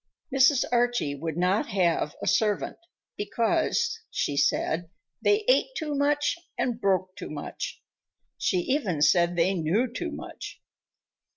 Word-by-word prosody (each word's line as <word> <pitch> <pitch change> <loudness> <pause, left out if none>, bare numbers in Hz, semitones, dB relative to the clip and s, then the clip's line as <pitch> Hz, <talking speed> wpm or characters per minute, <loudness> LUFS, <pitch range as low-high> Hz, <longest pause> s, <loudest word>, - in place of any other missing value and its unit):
Mrs. 265 0 +5
Archie 240 -11 +1
would 160 +2 -4
not 180 +4 +2
have 170 -5 +1
a - - -3
servant 210 -3 +1 0.4
because, 320 - 0
she 145 - -1
said, 160 +3 +1 0.3
"they 420 +1 +2
ate - - +3
too 305 -3 -3
much 290 +2 +1 0.2
and 240 -1 -1
broke 185 -1 +1
too - - -7
much"; 145 -1 -6 0.6
she - - 0
even 190 - 0
said 170 +3 +4
they 175 +3 +2
knew 180 +7 +1
too - - -3
much. - - -8
200 Hz, 130 wpm, -27 LUFS, 170-275 Hz, 0.6 s, Mrs